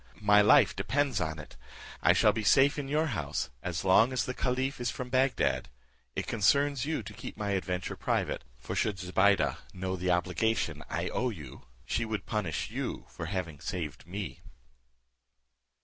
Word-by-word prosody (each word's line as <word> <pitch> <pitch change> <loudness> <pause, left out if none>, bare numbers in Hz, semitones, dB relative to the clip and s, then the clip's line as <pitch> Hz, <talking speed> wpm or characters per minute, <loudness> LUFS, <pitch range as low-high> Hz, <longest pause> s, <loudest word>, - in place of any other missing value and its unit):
My 105 0 +6
life 105 - +6
depends 135 -6 0
on 80 -1 -2
it. 75 - -11 0.4
I - - +6
shall - - +4
be 110 - -2
safe 135 +7 +5
in 140 - -4
your 150 +3 +1
house 70 -3 -3
as 90 +1 -3
long 110 +6 +5
as 130 -1 0
the 125 - -3
caliph 130 +1 -1
is 120 - 0
from 125 +2 -5
Bagdad. 130 0 +1 0.5
It - - -2
concerns 140 +5 +2
you 160 - -1
to - - -9
keep - - -8
my 105 -1 -2
adventure 90 -1 -2
private; - - -1
for 65 - -6
should 105 -3 0
Zobeide 95 +2 +2 0.2
know 95 0 -2
the 90 0 -2
obligation 90 +5 0
I - - -2
owe 125 - 0
you, 75 - -10 0.2
she 115 - 0
would 110 -4 -3
punish 105 -8 -2
you - - -4
for 80 - -6
having 85 -5 -4
saved 80 -2 -5
me. 95 -7 -5
100 Hz, 170 wpm, -30 LUFS, 90-125 Hz, 0.5 s, My